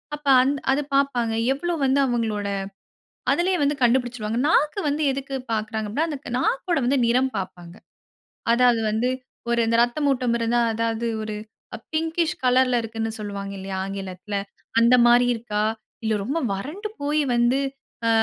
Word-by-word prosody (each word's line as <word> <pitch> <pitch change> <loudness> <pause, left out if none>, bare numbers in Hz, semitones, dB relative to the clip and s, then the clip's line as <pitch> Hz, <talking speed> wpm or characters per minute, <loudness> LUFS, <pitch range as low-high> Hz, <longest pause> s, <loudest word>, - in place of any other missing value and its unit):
அப்ப 295 -1 -12
அந்த 280 +2 +1
அதை 285 +2 +2
பாப்பாங்க. 245 -5 +1 0.2
எவ்வளவு 330 +2 -3
வந்து 270 +1 +3
அவுங்களோட, 220 -4 -1 0.8
அதிலயே 360 +1 +2
வந்து 290 +1 +2
கண்டுபிடிச்சிடுவாங்க. 240 -2 +1
நாக்கு 305 +4 +2
வந்து 295 +2 -1
எதுக்கு 275 0 -4 0.2
பாக்கிறாங்க 220 0 -2
அப்டின்னா, 305 +10 0
அந்த 285 -3 -5 0.2
நாக்கோட 335 +6 0
வந்து 270 +1 +2
நிறம் 255 +2 +2
பாப்பாங்க. 175 -1 -7 0.8
அதாவது 240 -2 +4
வந்து 235 +4 +1 0.4
ஒரு 235 0 +2
இந்த 230 - +2
இரத்தம் 265 +5 +1
ஓட்டம் 250 -2 0
இருந்தா, 235 +1 +2
அதாவது 230 0 -1 0.2
ஒரு 215 -1 -4 0.6
பின்ங்கிஷ் 325 +1 0
கலர்ல 255 0 +4
இருக்குன்னு 225 0 -3
சொல்லுவாங்க 200 -1 -5
இல்லயா, 190 0 -5
ஆங்கிலத்தில 195 +1 -6 0.4
அந்த 235 +2 +6
மாரி 245 +1 +6
இருக்கா, 215 -2 -2 0.4
இல்லை 220 -1 +1
ரொம்ப 285 +9 -1
வறண்டு 325 - -5
போயி 295 +1 +1
வந்து 240 +3 +3 0.5
அ - - +4
245 Hz, 145 wpm, -24 LUFS, 220-280 Hz, 0.8 s, அந்த